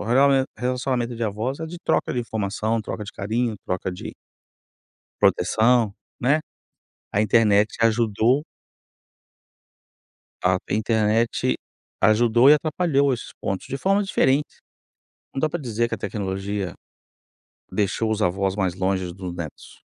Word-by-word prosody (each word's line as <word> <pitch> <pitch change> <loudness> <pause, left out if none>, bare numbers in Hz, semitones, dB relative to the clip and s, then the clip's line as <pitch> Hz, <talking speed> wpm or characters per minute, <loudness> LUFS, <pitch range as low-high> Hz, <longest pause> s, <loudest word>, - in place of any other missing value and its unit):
o - - -3 0.6
relacionamento 125 -1 -1
de 115 - -5
avós 110 +8 -3
é 160 - -3
de 175 +2 -8
troca - - +1
de 125 - -1
informação, 110 0 -2
troca 105 - -5
de 100 - -9
carinho, 115 +3 -1
troca 90 0 -2
de 90 - -7 1.1
proteção, 110 +3 +3 0.3
né. 140 +5 +3 0.7
A 105 - +2
internet 105 -1 +4
ajudou 115 +4 +3 2.0
a 90 0 +3
internet 110 +1 +1 0.5
ajudou 120 +4 +5
e - - +10
atrapalhou 150 -2 +2
esses 120 - -6
pontos 95 -1 -3
de 135 - -3
formas 195 +5 +1
diferentes. 140 -4 +1 0.8
Não 135 - -2
dá 155 - +2
para 175 +1 -4
dizer 120 -2 -1
que - - -2
a - - -7
tecnologia 95 -2 -3 1.0
deixou 105 +2 0
os 110 0 -1
avós 95 +1 +1
mais 95 -4 0
longe 95 -1 -1
dos 90 -1 -6
netos 80 -4 -9
110 Hz, 130 wpm, -23 LUFS, 100-125 Hz, 2.0 s, e